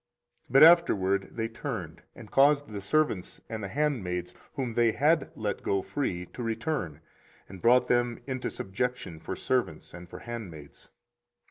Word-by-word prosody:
24:034:011 -, -, -13 dB
But 135 Hz, +3 st, +8 dB
afterward 100 Hz, -, +5 dB
they 115 Hz, -1 st, -2 dB
turned, 115 Hz, -, -6 dB
and -, -, -12 dB
caused 145 Hz, +1 st, +4 dB
the 105 Hz, -1 st, -6 dB
servants 110 Hz, -3 st, 0 dB
and 110 Hz, -2 st, -5 dB
the -, -, -3 dB
handmaids, 95 Hz, -, -2 dB, 0.2 s
whom 130 Hz, -5 st, -2 dB
they 115 Hz, -1 st, +3 dB
had 150 Hz, +2 st, +2 dB
let 105 Hz, -2 st, -3 dB
go 100 Hz, -1 st, 0 dB
free, 90 Hz, -11 st, -3 dB
to 125 Hz, -, -9 dB
return, 115 Hz, -, -3 dB, 0.5 s
and 95 Hz, -1 st, -11 dB
brought 125 Hz, +1 st, +5 dB
them 120 Hz, -1 st, +1 dB
into 130 Hz, -2 st, -3 dB
subjection 125 Hz, -3 st, -4 dB
for -, -, -5 dB
servants 125 Hz, -12 st, -2 dB
and 90 Hz, 0 st, -10 dB
for -, -, -9 dB
handmaids. 95 Hz, -12 st, -9 dB
115 Hz, 155 wpm, -28 LUFS, 95-130 Hz, 0.5 s, But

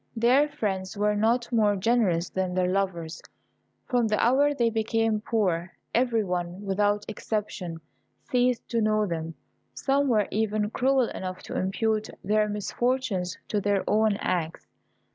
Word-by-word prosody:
Their 255 Hz, +6 st, +4 dB
friends 190 Hz, -7 st, -3 dB
were 210 Hz, 0 st, +2 dB
not 235 Hz, +4 st, +1 dB
more 215 Hz, -3 st, +3 dB
generous 190 Hz, -4 st, +1 dB
than 185 Hz, -1 st, -2 dB
their 185 Hz, -1 st, +2 dB
lovers. 180 Hz, -4 st, -2 dB, 0.6 s
From 245 Hz, -3 st, +1 dB
the 210 Hz, -1 st, +1 dB
hour 275 Hz, +5 st, +4 dB
they 235 Hz, -5 st, +1 dB
became 225 Hz, -1 st, 0 dB
poor, 185 Hz, -6 st, -1 dB, 0.2 s
every 235 Hz, -2 st, +2 dB
one, 180 Hz, +1 st, -3 dB
without 205 Hz, +1 st, +1 dB
exception, 205 Hz, -6 st, -4 dB, 0.5 s
ceased 250 Hz, -1 st, +1 dB
to 230 Hz, -1 st, +1 dB
know 215 Hz, 0 st, +2 dB
them. 165 Hz, -3 st, -4 dB, 0.4 s
Some 280 Hz, +1 st, +1 dB
were 215 Hz, -5 st, +2 dB
even 215 Hz, 0 st, 0 dB
cruel 260 Hz, 0 st, +2 dB
enough 185 Hz, -1 st, -6 dB
to -, -, -7 dB
impute 215 Hz, +3 st, 0 dB
their 210 Hz, +2 st, +2 dB
misfortunes 210 Hz, -3 st, -1 dB
to 210 Hz, -, 0 dB
their 200 Hz, -1 st, +1 dB
own 215 Hz, -1 st, +3 dB
acts. 170 Hz, -5 st, -2 dB
210 Hz, 145 wpm, -26 LUFS, 190-230 Hz, 0.6 s, Their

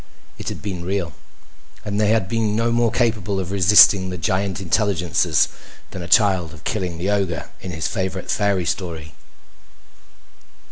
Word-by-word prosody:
It -, -, -4 dB
had -, -, -8 dB
been 95 Hz, -4 st, -5 dB
real. 95 Hz, -2 st, -3 dB, 0.7 s
And 105 Hz, +1 st, -1 dB
they 105 Hz, -, +2 dB
had 110 Hz, -4 st, +2 dB
been 110 Hz, -1 st, -1 dB
no 115 Hz, +1 st, +1 dB
more 120 Hz, 0 st, +2 dB
capable 110 Hz, -5 st, 0 dB
of 95 Hz, -1 st, -4 dB
resisting 95 Hz, 0 st, +6 dB
the 90 Hz, -, -5 dB
giant 95 Hz, +3 st, -1 dB
intelligences 95 Hz, -2 st, +1 dB, 0.4 s
than 95 Hz, -, -7 dB
a 85 Hz, -, -6 dB
child 90 Hz, -2 st, +2 dB
of 75 Hz, -, -16 dB
killing 90 Hz, -5 st, -3 dB
the 95 Hz, +4 st, -1 dB
ogre 95 Hz, -5 st, -2 dB
in 95 Hz, -, -7 dB
his 80 Hz, -2 st, -4 dB
favorite 95 Hz, -1 st, -3 dB
fairy 100 Hz, -4 st, 0 dB
story. 80 Hz, -4 st, -4 dB
95 Hz, 155 wpm, -21 LUFS, 90-105 Hz, 0.7 s, resisting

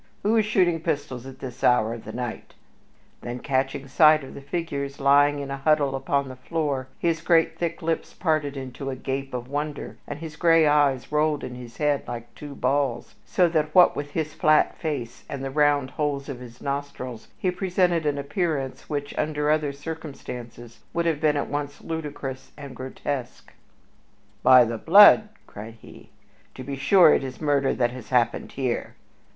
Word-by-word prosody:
Who 210 Hz, +3 st, +2 dB
is 220 Hz, -2 st, +3 dB
shooting 180 Hz, -5 st, +2 dB
pistols 145 Hz, -6 st, -3 dB
at 135 Hz, 0 st, -10 dB
this 125 Hz, -2 st, -8 dB
hour 115 Hz, -2 st, +3 dB
of 115 Hz, -, -9 dB
the -, -, -6 dB
night?" 120 Hz, -2 st, -6 dB, 0.7 s
Then, 120 Hz, 0 st, -5 dB
catching 135 Hz, +1 st, -2 dB
sight 155 Hz, +2 st, +5 dB
of 135 Hz, -, -10 dB
the -, -, -9 dB
figures 140 Hz, -2 st, -4 dB
lying 145 Hz, +1 st, +4 dB
in 140 Hz, -1 st, -5 dB
a 140 Hz, -, -3 dB
huddle 145 Hz, -1 st, +2 dB
upon 140 Hz, +1 st, -1 dB
the 130 Hz, -, -8 dB
floor, 140 Hz, -2 st, -2 dB
his 165 Hz, -2 st, 0 dB
great, 165 Hz, -1 st, +2 dB
thick 170 Hz, -2 st, -3 dB
lips 165 Hz, 0 st, -2 dB
parted 155 Hz, -4 st, 0 dB
into 135 Hz, +1 st, -6 dB
a 130 Hz, -, -3 dB
gape 135 Hz, +1 st, -4 dB
of 125 Hz, -1 st, -5 dB
wonder 145 Hz, +1 st, -4 dB
and 145 Hz, -, -5 dB
his 155 Hz, -1 st, -8 dB
gray 165 Hz, -1 st, +5 dB
eyes 145 Hz, -3 st, +2 dB
rolled 150 Hz, -1 st, +1 dB
in 125 Hz, -, -6 dB
his 125 Hz, -1 st, -10 dB
head 145 Hz, -2 st, +1 dB
like 120 Hz, -1 st, -7 dB
two 145 Hz, -2 st, -9 dB
balls, 135 Hz, -1 st, -1 dB
so 185 Hz, -6 st, +3 dB
that 155 Hz, -2 st, -1 dB
what 180 Hz, -1 st, +7 dB
with 145 Hz, 0 st, -5 dB
his 155 Hz, -1 st, -2 dB
flat 155 Hz, 0 st, +3 dB
face 130 Hz, -7 st, -5 dB
and 135 Hz, -1 st, -5 dB
the 135 Hz, -, -4 dB
round 145 Hz, -2 st, +2 dB
holes 145 Hz, -3 st, -2 dB
of 135 Hz, -4 st, -6 dB
his 125 Hz, -1 st, -12 dB
nostrils 140 Hz, -4 st, -5 dB
he 185 Hz, -, 0 dB
presented 180 Hz, -2 st, +1 dB
an 145 Hz, -1 st, 0 dB
appearance 140 Hz, -2 st, -3 dB
which, 145 Hz, -1 st, -4 dB
under 150 Hz, -1 st, 0 dB
other 155 Hz, -2 st, +1 dB
circumstances, 135 Hz, -6 st, -8 dB, 0.2 s
would 170 Hz, 0 st, +1 dB
have 160 Hz, -3 st, 0 dB
been 150 Hz, -2 st, +3 dB
at 145 Hz, -, -1 dB
once 145 Hz, 0 st, -4 dB
ludicrous 145 Hz, -5 st, -6 dB
and 140 Hz, -3 st, -9 dB
grotesque. 130 Hz, 0 st, -6 dB, 0.9 s
"By 125 Hz, -1 st, +7 dB
the 115 Hz, 0 st, -4 dB
blood!" 205 Hz, -, +7 dB, 0.2 s
cried 110 Hz, +2 st, -10 dB
he, -, -, -15 dB, 0.5 s
"to 130 Hz, -, -7 dB
be 140 Hz, +2 st, -5 dB
sure 155 Hz, +4 st, +6 dB
it -, -, +1 dB
is 130 Hz, -1 st, -7 dB
murder 140 Hz, -3 st, +1 dB
that 120 Hz, -1 st, +1 dB
has 125 Hz, -3 st, -10 dB
happened 125 Hz, -2 st, +1 dB
here." 130 Hz, -3 st, -3 dB
145 Hz, 180 wpm, -25 LUFS, 130-155 Hz, 0.9 s, what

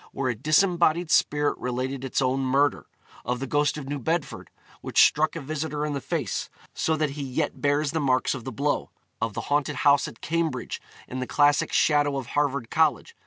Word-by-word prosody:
where 130 Hz, -2 st, -1 dB
a -, -, -5 dB
disembodied 170 Hz, -, +2 dB
spirit 145 Hz, 0 st, +2 dB
related 130 Hz, +2 st, -3 dB
its 135 Hz, +1 st, 0 dB
own 130 Hz, +1 st, +1 dB
murder; 135 Hz, +2 st, +1 dB, 0.4 s
of 125 Hz, +1 st, -2 dB
the 135 Hz, -, -3 dB
ghost 145 Hz, +2 st, +1 dB
of 145 Hz, -3 st, -7 dB
New 145 Hz, 0 st, -3 dB
Bedford, 165 Hz, +4 st, -3 dB, 0.3 s
which -, -, +4 dB
struck 155 Hz, +2 st, +3 dB
a -, -, -3 dB
visitor 150 Hz, +1 st, -3 dB
in 150 Hz, -, -2 dB
the 140 Hz, -, -3 dB
face, 145 Hz, -, -3 dB, 0.2 s
so 160 Hz, -, 0 dB
that 155 Hz, -2 st, 0 dB
he 145 Hz, +1 st, -6 dB
yet 130 Hz, -2 st, -3 dB
bears 145 Hz, 0 st, +1 dB
the 160 Hz, -, -1 dB
marks 130 Hz, -3 st, +1 dB
of 130 Hz, -4 st, -6 dB
the 130 Hz, -, -5 dB
blow; 145 Hz, +2 st, -1 dB, 0.3 s
of 110 Hz, -2 st, -2 dB
the -, -, -2 dB
haunted 145 Hz, 0 st, 0 dB
house 140 Hz, +1 st, +3 dB
at 115 Hz, -, -11 dB
Cambridge, 165 Hz, 0 st, -2 dB, 0.3 s
in 130 Hz, -, -5 dB
the 130 Hz, -, -3 dB
classic 145 Hz, 0 st, +3 dB
shadow 145 Hz, -2 st, +3 dB
of 135 Hz, -, -4 dB
Harvard 140 Hz, -5 st, 0 dB
College. 155 Hz, -5 st, +1 dB
145 Hz, 200 wpm, -25 LUFS, 130-150 Hz, 0.4 s, which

